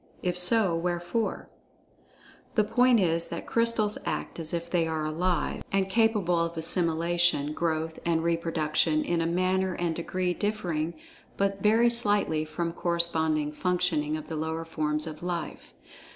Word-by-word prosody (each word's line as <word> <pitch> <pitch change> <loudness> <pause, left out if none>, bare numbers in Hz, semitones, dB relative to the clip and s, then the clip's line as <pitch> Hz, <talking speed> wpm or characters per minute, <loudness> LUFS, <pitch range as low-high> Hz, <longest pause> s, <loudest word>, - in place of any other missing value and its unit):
If 180 -1 0
so, 180 0 +3
wherefore? 175 +5 -2 1.1
The 215 - +4
point 245 +2 +4
is 170 -3 +2
that - - -6
Crystals 230 -2 +1
act - - -4
as 160 -1 +1
if 170 0 -3
they 170 -1 +1
are 160 -1 -2
"alive," 170 +1 -1
and 195 -1 +1
capable 210 -6 +2
of 170 0 -2
assimilation, 165 -2 +1
growth, 160 0 -2
and 165 -1 +1
reproduction, 160 -2 +1
in 170 -1 0
a 165 - 0
manner 185 +1 +1
and 170 -2 -1
degree 180 +2 -1
dif[Pg 205 +4 -1
53]fering 170 -6 -3 0.4
but 195 0 0
very 225 +3 +4
slightly 205 -9 +1
from 165 +2 -3
corresponding 160 -3 +1
functioning 165 -3 0
of 155 - -8
the 160 - -6
lower 160 +1 -3
forms 150 -1 -1
of 155 -1 -7
"life." 175 -2 -5
170 Hz, 150 wpm, -28 LUFS, 160-185 Hz, 1.1 s, The